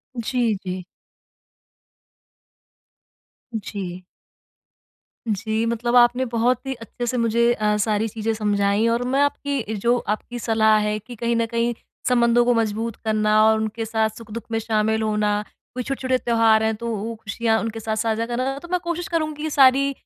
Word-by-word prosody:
जी, 235 -1 0
जी। 185 0 -4 2.7
जी। 185 -4 -5 1.3
जी, 220 +2 -1
मतलब 235 +1 -1
आपने 245 +1 +5
बहुत 245 +2 0
ही 270 - -2
अच्छे 235 0 -7
से 250 - -1
मुझे 235 0 +3
अ, 210 -2 +1
सारी 210 +1 +1
चीज़ें 225 +1 -2
समझाई 205 0 +1
और 235 +1 +1
मैं 270 +2 +2
आपकी 285 0 0
ये 220 -3 -3
जो 235 +4 +2 0.2
आपकी 240 +2 -9
सलाह 220 -1 +3
है 210 0 0
कि 240 +4 -11
कहीं 235 +1 -1
न 230 - +1
कहीं 235 +1 0 0.3
संबंधों 240 -1 +4
को 245 - +4
मजबूत 225 0 -1
करना 215 0 +3
और 220 0 +3
उनके 220 +1 -3
साथ 220 0 +1
सुख-दुख 230 0 -8
में 225 - 0
शामिल 220 0 0
होना, 210 -1 0 0.3
कोई 250 - -3
छोटे-छोटे 260 0 -1
त्योहार 225 -3 +3
हैं 220 0 +1
तो 235 +2 -6
वो 220 +3 -4
खुशियाँ 220 +1 -1
उनके 225 0 -4
साथ 220 0 -2
साझा 225 0 0
करना 255 +3 -2
तो 345 - -11
मैं 360 - +2
कोशिश 340 0 -3
करूँगी 310 -3 -2
ये 315 - -1
सारी 275 0 +5
230 Hz, 165 wpm, -22 LUFS, 215-245 Hz, 2.7 s, आपने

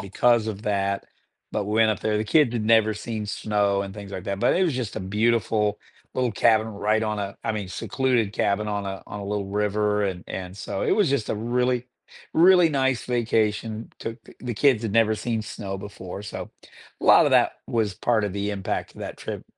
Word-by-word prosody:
because 110 +4 +2
of 105 -1 -5
that. 100 -2 0 0.5
But 105 - -1
we 105 - -2
went 110 0 +5
up 105 - -2
there, 110 -1 0
the 105 - 0
kids 145 +1 +4
had 110 -3 -1
never 110 -1 +4
seen 110 0 -4
snow 100 -1 0
and 100 -1 -6
things 100 -2 -9
like 95 - -6
that, 100 0 -3
but - - +3
it 185 - +3
was 160 - 0
just 125 -4 -4
a - - -2
beautiful 105 +1 +1 0.4
little 125 -2 0
cabin 110 +1 +3
right 110 +1 0
on 105 -1 -1
a 100 -1 -4
I 115 - 0
mean, 105 -3 -4
secluded 120 +1 0
cabin 105 0 0
on 100 -1 -2
a 95 0 -5
on 105 - -7
a - - -6
little 100 -1 -2
river, 105 +1 0
and 95 -3 -3
and 95 0 -6
so 95 - -4
it - - +2
was 200 -10 +3
just 140 -6 0
a - - 0
really, 125 +3 0 0.5
really 175 +1 +6
nice 135 -4 +1
vacation. 110 -2 0
Took 115 0 -6
the - - -15
the 125 -2 -4
kids 125 0 +3
had 110 -3 -2
never 110 -1 +4
seen 115 -1 -2
snow 100 -2 -6
before 95 -1 -8
so, 105 - -7 0.5
a - - -5
lot - - +7
of - - +2
that - - +5
was 110 -5 0
part 115 +1 +1
of 100 - -2
the 100 +1 -2
impact 100 -2 -3
of - - -12
that - - -6
trip. - - -6
105 Hz, 220 wpm, -25 LUFS, 100-115 Hz, 0.5 s, lot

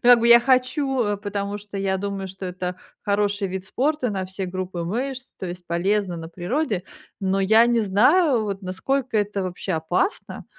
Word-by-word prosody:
Ну - - +5
как 245 - +9
бы 235 - +3
я 235 0 +9
хочу, 255 -3 +1
потому 205 0 -3
что 205 0 -8
я 195 -1 0
думаю, 200 -1 -3
что 190 0 -7
это 180 0 -4 0.3
хороший 205 0 +1
вид 190 0 -5
спорта 260 +4 0
на 190 -2 -2
все 190 +1 -5
группы 185 -1 -4
мышц, 250 +7 -3
то 185 - -4
есть 175 0 -7
полезно, 185 +2 0
на 165 0 -7
природе. 195 - -2 0.4
Но 190 0 +1
я 220 +4 +5
не 235 -1 +3
знаю 240 - +4
вот 200 -1 -4
насколько 230 +7 -1
это 205 -1 -1
вообще 185 +1 -4
опасно? 175 - -1
200 Hz, 180 wpm, -23 LUFS, 185-235 Hz, 0.4 s, как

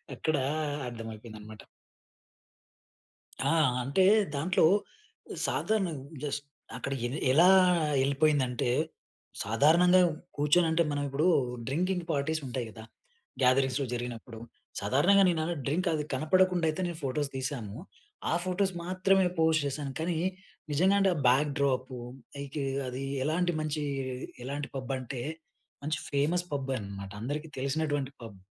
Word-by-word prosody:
అక్కడ 155 -1 0 0.5
అర్థమైపోయింది 110 -1 -8
అన్నమాట. 110 0 -11 1.8
అ! - - +3 0.3
అంటే 140 +9 +2 0.3
దాంట్లో 165 +6 +2 0.8
సాధారణంగా 180 -11 -1 0.2
జస్ట్ 145 0 -3 0.3
అక్కడ 135 - -3
ఎల్ 135 +5 -4
ఎలా 170 +7 +6 0.5
ఎళ్ళిపోయిందంటే, 140 -4 +1 0.7
సాధారణంగా 165 - +5 0.4
కూర్చొనంటే 160 +3 +3
మనం 145 0 -1
ఇప్పుడు 150 +6 +1 0.4
డ్రింకింగ్ 180 +4 -1
పార్టీస్ 155 +2 -1
ఉంటాయి 125 -1 -3
గదా! 110 0 -11 0.6
గ్యాదరింగ్స్‌లో 130 +1 +3
జరిగినప్పుడు. 120 -1 -6 0.4
సాధారణంగా 150 - +4
నేను 160 -2 0 0.2
డ్రింక్ 175 +7 0
అది 150 -1 -1
కనపడకుండా 175 +4 +3
అయితే 155 +4 -2
నేను 170 -2 -5
ఫోటోస్ 140 +2 -1
తీశాము. 125 -6 -4 0.6
ఆ - - +2
ఫోటోస్ 190 +1 0
మాత్రమే 185 +1 +2
పోస్ట్ 160 -1 +4
చేశాను. 140 0 -3
కానీ 165 0 -1 0.5
నిజంగా 185 +7 +3
అంటే 195 -1 +4
ఆ - - -4
బ్యాక్ 140 +4 +4
డ్రాప్ 130 -2 0 0.5
ఐతే 140 +1 -4 0.2
అది 130 +2 -4 0.2
ఎలాంటి 175 +4 +1
మంచి 155 -1 -2 0.6
ఎలాంటి 145 +2 -4
పబ్ 130 0 -4
అంటే, 130 -1 -6 0.6
మంచి 155 +1 -1
ఫేమస్ 160 +6 +1
పబ్బే 135 -1 -1
అనమాట. 100 -1 -7
అందరికీ 150 +6 -3
తెలిసినటువంటి 140 0 -1
పబ్. 100 -4 -10
145 Hz, 120 wpm, -29 LUFS, 130-165 Hz, 1.8 s, ఎలా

